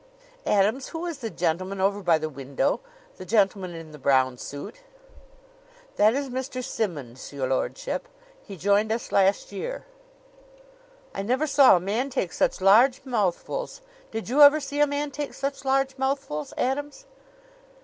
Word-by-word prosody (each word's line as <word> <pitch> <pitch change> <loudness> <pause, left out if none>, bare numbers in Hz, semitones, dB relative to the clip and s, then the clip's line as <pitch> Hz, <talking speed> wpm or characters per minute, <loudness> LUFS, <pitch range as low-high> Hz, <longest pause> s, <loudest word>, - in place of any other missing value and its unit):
"Adams, 210 +7 +2
who 330 +1 -5
is 335 -5 -5
the 230 -4 -4
gentleman 185 +2 -2
over 200 +2 +1
by 175 -4 +3
the 155 0 -3
window 140 -2 -1 0.4
the - - -8
gentleman 195 -4 +1
in 165 -1 -9
the 150 - -12
brown 130 -1 +3
suit?" 145 - -8 1.2
"That 215 +3 +4
is 280 0 -2
Mr. 255 0 -4
Simmonds, 155 - -4
your 140 -2 -3
lordship. 130 - -2 0.3
He 195 - -10
joined 205 +4 +2
us 230 +1 -3
last 195 +1 +2
year." - - -5 1.3
"I - - -3
never 255 +9 0
saw 280 -6 +6
a - - +2
man 215 +9 -2
take 195 -10 -2
such - - 0
large 235 +7 +5
mouthfuls. 250 - -2 0.3
Did 225 0 -5
you 270 +6 +2
ever 290 +1 +9
see 285 0 -5
a 295 - +5
man 285 0 -2
take 290 0 -5
such 275 0 -4
large 270 0 +1
mouthfuls, 265 - -2
Adams?" 290 - -2
220 Hz, 155 wpm, -25 LUFS, 180-275 Hz, 1.3 s, ever